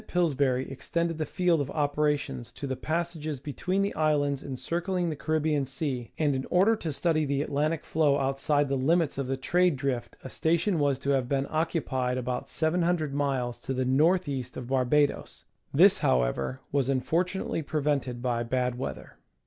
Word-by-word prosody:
Pillsbury 140 -7 +1
extended 165 +4 -2
the 155 - -1
field 175 -4 +2
of 140 - -3
operations 145 - -1
to 145 - -6
the 130 -1 -2
passages 155 -2 -3
between 180 +8 -1
the 200 - -1
islands 145 -3 +1
encircling 175 +6 -2
the - - -3
Caribbean 155 -1 0
Sea, 135 -3 -4
and 150 -3 +2
in 130 0 -2
order 195 +6 +4
to 165 - -3
study 155 +1 +1
the 140 -1 0
Atlantic 150 +2 -1
flow 150 -3 +2
outside 140 +2 +1
the 135 - 0
limits 155 +3 +1
of 135 - -2
the 135 0 -1
trade 175 +5 +2
drift 130 -2 -3
a 130 - -7
station 170 +2 +1
was 140 -2 +2
to 140 +1 -1
have 130 -3 +1
been 140 -1 +1
occupied 140 -6 -1
about 125 0 -3
700 165 -2 0
miles 130 -4 -1
to 135 - -3
the 130 0 0
north 165 +8 +3
east 135 -3 -4
of 125 -1 -6
Barbados; 135 +2 +1 0.3
this, - - +6
however, 65 - 0
was 135 -2 +1
unfortunately 165 +7 0
prevented 140 -5 -1
by 120 -2 0
bad 125 +1 -1
weather. 135 - -6
145 Hz, 170 wpm, -28 LUFS, 130-160 Hz, 0.3 s, this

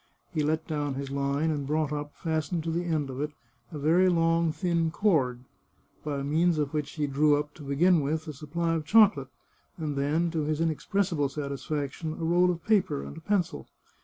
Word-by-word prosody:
He 155 - 0
let 155 +2 0
down 145 -3 -2
his 135 0 -5
line, 140 +3 0
and 145 -3 -3
brought 150 0 0
up, 145 0 -5
fastened 160 0 -2
to 165 - -2
the 170 +2 -1
end 155 -5 -1
of 130 +2 -5
it, 150 0 -3 0.4
a 155 - -6
very 165 +6 +4
long, 165 -1 +2
thin 165 +1 0
cord, 150 - +1 0.6
by 145 -2 -3
means 160 +4 +2
of 145 -1 -1
which 150 -1 -2
he 150 -2 -1
drew 145 +1 +3
up, 150 0 -4
to - - -14
begin 155 +5 +3
with, 155 +3 -2
a 155 - -5
supply 165 +4 -2
of 160 -2 -1
chocolate, 205 - +5 0.5
and 155 -4 -3
then, 155 +5 +1
to 160 - -1
his 150 +1 -1
inexpressible 165 0 0
satisfac 140 0 -3
tion, 160 +1 -5
a 165 - -4
roll 175 +2 +4
of 170 -2 -3
paper 200 - +2
and 70 +1 -8
a - - -9
pencil. 180 - -1
155 Hz, 200 wpm, -28 LUFS, 145-165 Hz, 0.6 s, chocolate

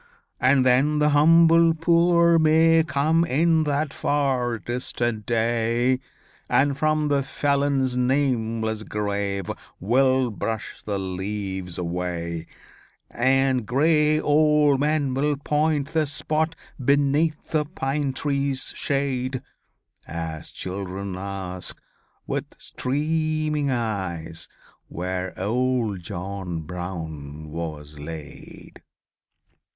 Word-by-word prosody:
And 130 0 +4
then 135 +4 +3
the 150 0 +3
humble 165 +2 +5
poor 170 0 +4
may 160 +1 +5
come 155 +2 +2
In 160 +1 +2
that 145 0 -1
far 130 -5 0
distant 120 -1 -3
day, 120 +2 +1 0.5
And 140 +1 +3
from 155 +1 +1
the 140 -1 +2
felon's 140 -2 0
nameless 115 -4 0
grave 100 -3 -2 0.3
Will 130 +3 +2
brush 110 +1 -4
the 100 -2 -3
leaves 95 -1 -4
away: 85 -1 -3 0.6
And 130 -1 +2
gray 150 +3 +3
old 150 -2 +3
men 145 -2 +1
will 145 +2 +1
point 150 0 0
the 160 -2 +1
spot 155 +3 -1 0.3
Beneath 145 +3 +1
the 155 -1 +2
pine 145 -2 -2
tree's 140 0 -1
shade, 130 -2 -1 0.6
As 80 -1 -5
children 95 0 -5
ask 95 -1 -5 0.5
with - - -2
streaming 155 +1 -1
eyes 95 -10 -3 0.4
Where 90 +1 -4
old 115 -1 0
John 90 -2 -5
Brown 80 -3 -7
was 75 -2 -6
laid." 75 -1 -10
130 Hz, 95 wpm, -24 LUFS, 100-150 Hz, 0.6 s, humble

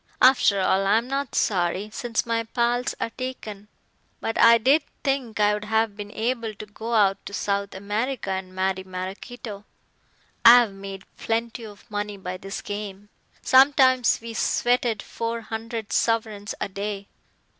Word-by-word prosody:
After 255 -6 +5
all, 195 +1 +2
I'm 225 +4 +3
not 275 0 -3
sorry, 190 +2 0
since 235 -1 -2
my 230 -1 0
pals 240 +2 0
are 230 - -2
taken. 220 -6 -7 0.5
But 225 - -3
I 230 0 +8
did 270 +7 +4 0.2
think 270 -6 -1
I'd 210 0 +2
have 220 -1 +1
been 205 -1 -7
able 230 -1 -2
to 215 - -8
go 210 -1 +1
to 200 - -9
South 200 -1 -2
America 210 +3 -2
and 190 -1 -4
marry 190 0 -1
Maraquito. 195 +4 -7 0.8
I've 235 -3 +8
made 195 -1 -8
plenty 230 +1 -2
of 205 -1 -14
money 205 0 -3
by 185 -1 -5
this 195 +2 -6
game. 205 -1 -6 0.3
Sometimes 260 -2 +5
we 230 0 -6
sweated 240 -1 +1
four 230 0 -4
hundred 225 0 -5
sovereigns 220 -3 0
a - - -1
day. 200 0 -5
220 Hz, 145 wpm, -24 LUFS, 200-235 Hz, 0.8 s, I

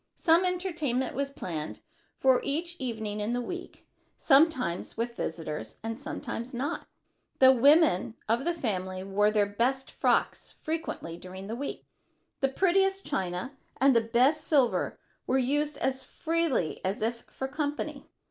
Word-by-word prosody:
Some 335 +2 +4
entertainment 335 -9 -1
was 280 +1 -1
planned 165 - -5 0.4
for 260 -1 +4
each 335 +5 -2
evening 220 -4 -3
in 210 +3 -1
the 245 - 0
week, 355 +8 -7 0.3
sometimes 270 - +3
with 235 +1 -2
visitors 150 - -4
and 225 +1 -4
sometimes 260 -4 -5
not. 265 +4 -3 0.5
The 260 0 +8
women 270 - +4
of 230 +4 +1
the 345 +2 0
family 185 - -3
wore 200 +2 +2
their 210 -1 +3
best 250 +6 -1
frocks - - 0
frequently 310 - -4
during 185 +2 -9
the 220 +3 -4
week. 280 +3 -5 0.5
The 270 - +2
prettiest 385 +5 +2
china 185 +8 -3 0.2
and 270 -1 +5
the 230 - +6
best 250 +7 +3
silver 270 -6 +2 0.3
were 260 - +3
used 290 +3 +1
as 265 0 -1
freely 325 - -1
as 195 +3 -1
if 235 +1 -1
for 265 - -4
company. 290 0 -3
260 Hz, 145 wpm, -29 LUFS, 215-295 Hz, 0.5 s, The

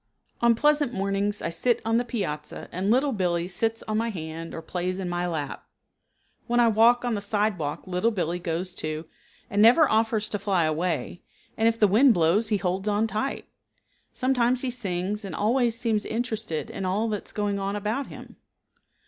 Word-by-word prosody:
On 235 -1 +5
pleasant 295 +1 +2
mornings 200 +1 -1
I 165 - -1
sit 240 +7 +1
on 225 +1 +2
the 240 - +2
piazza 155 - -4
and 185 +3 -2
Little 265 +5 +3
Billee 175 -5 0
sits 225 +5 -1
on 215 0 -1
my 230 +1 0
hand 165 -4 -6
or 165 - -7
plays 180 +2 -3
in 190 -2 -3
my 175 0 -1
lap. 155 -5 -4 0.8
When 240 0 +2
I 235 -1 +5
walk 235 +3 +4
on 240 - 0
the 205 - -2
sidewalk 205 -7 -1
Little 185 +4 +1
Billee 180 -5 -2
goes, 175 +1 -3
too, 155 -1 -4 0.4
and 205 +1 +1
never 250 +8 +7
offers 220 -1 +1
to 205 - -2
fly 195 -3 +1
away, 160 -1 -1 0.3
and 225 - +2
if 230 0 +1
the 210 - +6
wind 230 +5 +5
blows 175 +6 +3
he 210 - +2
holds 190 +2 -2
on 210 +1 +2
tight. 225 +5 -3 0.6
Sometimes 255 -1 +1
he 260 - -2
sings 200 -3 -3
and 190 -5 -6
always 230 +2 +1
seems 225 -3 0
interested 220 -8 -3
in 195 - -5
all 195 +5 0
that 210 -2 -4
is - - -8
going 205 -1 -1
on 195 +1 -2
about 215 +7 -2
him. - - -11
205 Hz, 190 wpm, -26 LUFS, 180-230 Hz, 0.8 s, never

